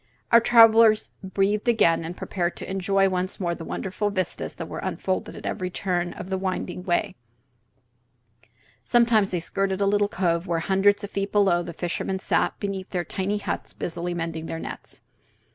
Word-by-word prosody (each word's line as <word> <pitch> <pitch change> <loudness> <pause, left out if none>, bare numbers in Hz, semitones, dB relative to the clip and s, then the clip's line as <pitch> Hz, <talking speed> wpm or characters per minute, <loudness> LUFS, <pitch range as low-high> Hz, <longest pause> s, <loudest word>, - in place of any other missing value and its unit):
Our 235 - +8
travellers 225 -2 +6
breathed 200 +3 0
again, 205 -9 +3
and 170 +2 -6
prepared 175 -2 -2
to - - -7
enjoy 195 +1 +2
once 185 0 -2
more 175 -3 -1
the 170 - -7
wonderful 195 +5 -3
vistas 185 -2 -3
that - - -6
were - - -6
unfolded - - -3
at - - -9
every 185 -3 -2
turn 175 -1 -2
of 185 +1 -8
the 190 - 0
winding 185 -1 -3
way. 185 +2 0 1.7
Sometimes 225 - +3
they 180 - -1
skirted 195 +3 -1
a 200 - +2
little 205 0 +2
cove 170 -2 0
where, 170 - 0
hundreds 195 +4 +2
of 205 - -6
feet 195 0 -2
below, 195 -4 +3
the 170 - -6
fishermen 175 +3 -3
sat 190 - 0
before 195 -2 -3
their 175 -2 -2
tiny 200 +2 -2
huts 205 - -4
busily 175 +1 -4
mending 165 -1 -4
their 165 - -4
nets. - - -9
190 Hz, 175 wpm, -25 LUFS, 175-205 Hz, 1.7 s, Our